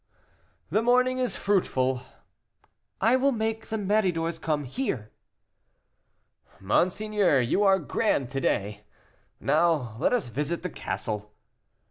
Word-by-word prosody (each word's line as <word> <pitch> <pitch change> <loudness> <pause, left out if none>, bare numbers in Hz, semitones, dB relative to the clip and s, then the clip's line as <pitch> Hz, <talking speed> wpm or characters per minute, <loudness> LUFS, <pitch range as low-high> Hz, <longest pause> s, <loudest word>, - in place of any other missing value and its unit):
"The 215 - +3
morning 250 +2 +3
is 250 -1 0
fruitful." 130 -10 +1 1.0
"I 225 +5 +4
will 270 +2 +3
make 220 -2 -2
the 220 - -2
Méridors 180 -6 0
come 150 -2 -1
here." 130 - -3 1.5
"Monseigneur, 185 - +2
you 125 - +1
are 195 -2 +5
grand 150 - 0
to 135 -1 -2
day. 105 -2 -1 0.6
Now 150 -10 +1
let - - +2
us 245 - 0
visit 150 +8 -2
the 180 - -3
castle." 105 0 -4
170 Hz, 115 wpm, -27 LUFS, 130-220 Hz, 1.5 s, are